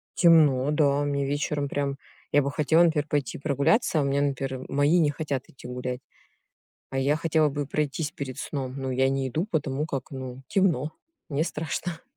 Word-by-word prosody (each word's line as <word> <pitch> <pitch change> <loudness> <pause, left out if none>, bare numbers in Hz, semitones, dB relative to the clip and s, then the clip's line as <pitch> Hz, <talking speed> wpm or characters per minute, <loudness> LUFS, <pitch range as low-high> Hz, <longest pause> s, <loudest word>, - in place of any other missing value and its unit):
темно, 150 -5 +5
да. 145 -2 +2
Мне 140 -1 0
вечером 145 0 -1
прям 140 -1 -2 0.4
я 145 - +6
бы 140 - -1
хотела, 160 +3 +4
например, 155 -3 +2
пойти 145 -4 -1
прогуляться, 155 - +2
а - - +2
у - - -1
меня, 140 +1 +1
например, 135 -2 -2
мои 145 +5 +3
не 150 -3 +4
хотят 145 -3 -3
идти 130 - -12
гулять. 125 +1 -4 0.9
А 135 - -2
я 140 +3 +2
хотела 160 -1 +2
бы 145 0 -3
пройтись 150 +1 -1
перед 130 -3 -6
сном. 130 -3 -4
Ну, 130 -1 -3
я 130 +1 +2
не 135 -1 -1
иду, 160 - -1
потому 150 -2 -1
как, 135 -4 -4
ну, 130 -1 -7
темно, 160 -7 +1 0.4
мне 150 +1 0
страшно. 160 +1 -4
145 Hz, 180 wpm, -26 LUFS, 135-155 Hz, 0.9 s, я